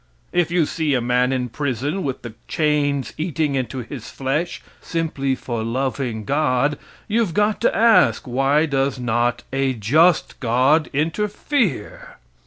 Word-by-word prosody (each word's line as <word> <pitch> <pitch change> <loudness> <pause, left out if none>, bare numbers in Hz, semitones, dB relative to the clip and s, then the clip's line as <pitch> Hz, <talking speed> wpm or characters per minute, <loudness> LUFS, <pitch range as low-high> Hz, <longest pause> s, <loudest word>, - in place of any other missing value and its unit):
If 175 -2 +2
you 170 -2 +2
see 150 -2 -1
a - - +2
man 125 +1 +1
in 125 -2 -1
prison 145 - -2
with 135 -7 -4
the 120 -2 -7
chains 145 -3 0
eating 155 -3 -1
into 130 -1 -2
his 120 0 -8
flesh 145 +6 -2 0.2
simply 150 -5 -1
for 120 -3 -4
loving 125 -2 -2
God, 145 0 +1 0.3
you've 215 -5 0
got 210 0 +1
to - - +2
ask 225 - +4
why 135 +5 +2
does 135 -2 0
not 120 0 0
a 135 -1 +1
just 155 - +2
God 130 +6 +2
interfere? 195 - -2
140 Hz, 140 wpm, -21 LUFS, 125-160 Hz, 0.3 s, ask